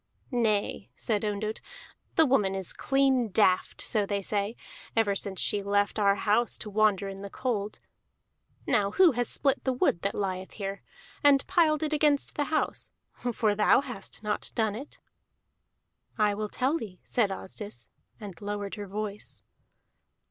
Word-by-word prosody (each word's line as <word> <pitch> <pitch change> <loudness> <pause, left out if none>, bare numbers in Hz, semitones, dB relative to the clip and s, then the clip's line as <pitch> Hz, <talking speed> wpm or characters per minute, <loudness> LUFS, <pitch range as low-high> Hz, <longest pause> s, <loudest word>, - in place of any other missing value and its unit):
"Nay," 215 - 0
said 215 -2 -1
Ondott, 210 +1 -2 0.5
"the 320 - +6
woman 210 -8 +2
is 190 -2 -2
clean 270 -3 +2
daft, 185 -2 +2
so 215 -3 +1
they 200 0 -2
say, 205 +3 -1 0.4
ever 225 -3 +3
since 195 -1 -3
she 205 - +1
left 205 +1 +1
our 200 -1 +4
house 215 +4 +2
to 210 - -7
wander 205 -2 +3
in 195 0 -7
the 200 - -6
cold. 215 -3 -3 0.9
Now 200 -1 +2
who 355 - +5
has 245 -1 -1
split 275 -2 +1
the 260 - +1
wood 170 -8 +1
that 200 - -1
lieth 185 -2 -3
here, 195 -1 -5 0.4
and 280 -1 +5
piled 310 -3 +3
it 310 0 -1
against 295 -1 +2
the 290 - -1
house? 310 +1 -1 0.4
For 215 -2 +1
thou 210 +5 +4
hast 225 -5 -6
not 210 0 -2
done 220 -3 +1
it." 270 +8 -8 1.2
"I 210 -2 +3
will 210 +1 -3
tell 275 +9 0
thee," 185 -5 -8
said 225 -5 +1
Asdis, 190 - -7 0.3
and 200 -6 -9
lowered 205 -1 -4
her 205 -2 -6
voice. 205 +1 -5
210 Hz, 155 wpm, -28 LUFS, 200-245 Hz, 1.2 s, the